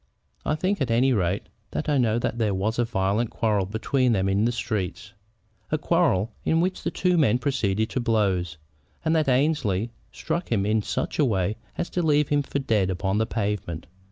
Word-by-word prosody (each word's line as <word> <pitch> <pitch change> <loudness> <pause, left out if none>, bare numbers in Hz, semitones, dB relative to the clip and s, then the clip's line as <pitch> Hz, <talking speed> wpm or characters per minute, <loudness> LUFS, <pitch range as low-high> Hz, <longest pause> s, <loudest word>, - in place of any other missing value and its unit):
I 150 - 0
think, 185 +2 -1
at 130 - 0
any 125 +3 +3
rate, 95 -2 0 0.3
that - - -3
I 145 -2 +2
know 115 -2 +2
that 120 0 -2
there 105 -4 +1
was 110 +5 -1
a 120 - +3
violent 105 0 0
quarrel 105 -4 0
between 120 +4 +1
them 95 -2 +1
in 100 +3 +2
the 120 - +2
streets, 105 -3 -3 0.6
a 155 - +2
quarrel 150 - +2
in 160 - +2
which 185 +2 0
the - - -1
two 180 -2 +1
men 120 -6 +4
proceeded 110 -5 0
to - - -1
blows, 100 -8 0 0.5
and 160 +1 +2
that 155 -3 +2
Annesley 125 -6 +1 0.2
struck 175 - -3
him 100 -4 +2
in 110 +1 +2
such - - -3
a - - +5
way 100 -3 0 0.2
as - - -1
to 180 - 0
leave 150 -3 +2
him 145 0 +3
for 140 - -3
dead 110 -8 +1
upon 95 +2 0
the 110 - +1
pavement. 100 -6 -3
115 Hz, 200 wpm, -25 LUFS, 100-140 Hz, 0.6 s, a